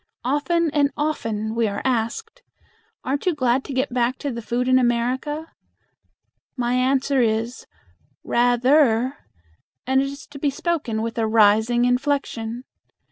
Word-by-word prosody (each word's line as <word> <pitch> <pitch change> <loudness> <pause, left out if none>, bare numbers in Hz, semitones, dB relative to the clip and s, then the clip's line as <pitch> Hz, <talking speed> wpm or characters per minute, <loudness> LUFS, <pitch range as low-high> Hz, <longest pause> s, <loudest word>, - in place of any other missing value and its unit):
Often 300 +5 +1
and 285 -1 +2
often 225 -8 -2
we 230 -1 +1
are 200 0 -4
asked, 230 -3 -2 0.6
"Aren't 280 +6 -2
you 355 - +2
glad 255 -1 +1
to - - -7
get 260 -1 -1
back 250 +1 +1
to 285 - -4
the 235 -1 -5
food 240 +3 -2
in 255 0 +5
America?" 255 +6 -1 1.1
My 240 -1 0
answer 265 +1 +2
is, 230 +2 -1 0.6
"Rather," 245 +1 +3 0.7
and 265 +1 +2
it - - 0
is 280 +1 -8
to 285 -1 -10
be 290 - +1
spoken 280 -7 -2
with 230 0 -4
a 220 - +1
rising 220 +2 +4
inflection. 245 -2 -1
250 Hz, 140 wpm, -22 LUFS, 235-280 Hz, 1.1 s, in